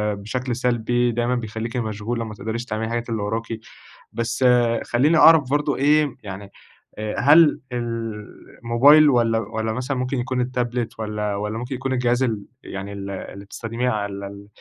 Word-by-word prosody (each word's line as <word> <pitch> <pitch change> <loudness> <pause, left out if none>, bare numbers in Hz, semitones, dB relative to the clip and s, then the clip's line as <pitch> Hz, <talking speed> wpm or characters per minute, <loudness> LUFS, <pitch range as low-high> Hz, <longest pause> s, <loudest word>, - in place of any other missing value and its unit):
بشكل 120 +5 -3
سلبي 120 0 +1
دايمًا 120 +2 0
بيخليكِ 115 +1 -4
مشغولة 115 +1 -3
ما 110 - -7
تقدريش 110 +3 -4
تعملي 110 -2 -3
الحاجات 120 +1 -3
اللي 110 -2 -2
وراكِ، 115 +2 -3 0.5
بس 120 +2 -1 0.4
خلّيني 145 +7 +3
أعرف 155 -5 +7
برضه 145 -1 +1
إيه 145 0 +2
يعني 100 0 -8 0.5
آآ 110 0 -4
هل 150 +3 +6
الموبايل 115 +4 +2
والّا 115 -3 +2
والّا 110 0 -3
مثلًا 130 +3 -3
ممكن 125 +2 -2
يكون 125 +1 -1
التابلت 120 -2 -2
والّا 105 -1 -2
والّا 105 +2 -3
ممكن 125 +3 -4
يكون 135 +1 -2
الجهاز 125 0 +1
ال 110 -5 -2 0.2
يعني 100 +1 -6
ال 100 0 -6
اللي 100 +1 -7
بتستخدميه 115 +4 -3
على 100 -3 -2
ال 100 0 -11
115 Hz, 155 wpm, -22 LUFS, 110-125 Hz, 0.5 s, أعرف